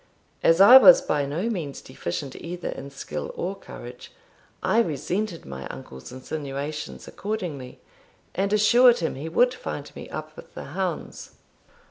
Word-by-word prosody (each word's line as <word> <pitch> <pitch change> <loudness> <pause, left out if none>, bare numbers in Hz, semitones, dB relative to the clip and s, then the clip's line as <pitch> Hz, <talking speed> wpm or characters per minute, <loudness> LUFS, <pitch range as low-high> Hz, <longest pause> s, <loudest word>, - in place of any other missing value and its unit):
As 165 +1 +4
I 235 +7 +11
was 265 0 +9
by 145 -2 -1
no 165 +10 -2
means 170 -11 -4
deficient 130 +3 -5
either 175 +1 -6
in 140 - -7
skill 75 - -6
or 190 +3 -3
courage, 125 -9 -11 0.5
I 225 - +3
resented 180 - -3
my 65 0 -7
uncle's 65 - -10
insinuation 145 +2 -5
accordingly, 175 -12 -5 0.5
and 195 +1 -1
assured 235 +4 +6
him 165 - -2
he 145 +5 -6
would 245 +9 +3
find 145 - -7
me - - -9
up 155 0 -7
with - - -14
the - - -6
hounds. 185 -3 -4
160 Hz, 145 wpm, -25 LUFS, 140-200 Hz, 0.5 s, I